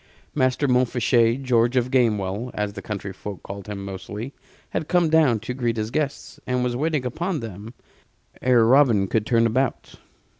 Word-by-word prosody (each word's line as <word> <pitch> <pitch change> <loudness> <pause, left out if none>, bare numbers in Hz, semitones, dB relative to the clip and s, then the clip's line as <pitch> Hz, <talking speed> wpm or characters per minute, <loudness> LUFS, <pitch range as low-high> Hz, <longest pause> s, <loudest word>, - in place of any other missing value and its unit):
Master 130 0 +1
Montfichet 125 -1 +2
George 120 -1 +2
of 125 0 +1
Gamewell, 110 -3 +1
as 105 -1 -2
the 100 - -7
country 100 -2 -5
folk 100 0 -8
called 100 0 -8
him 100 -2 -6
mostly 105 +6 -7 0.4
had 155 - -2
come 175 -3 +2
down 150 -8 +4
to 125 +2 -4
greet 120 -3 -1
his 110 +1 -2
guests, 145 -1 -3
and 125 0 0
was 125 -1 -1
waiting 150 0 -1
upon 170 +7 -2
them 110 +1 -8 0.7
ere 125 -3 +4
Robin 120 -5 +5
could 110 +2 -1
turn 115 -1 +3
about. 125 +3 -1
120 Hz, 165 wpm, -23 LUFS, 105-130 Hz, 0.7 s, Robin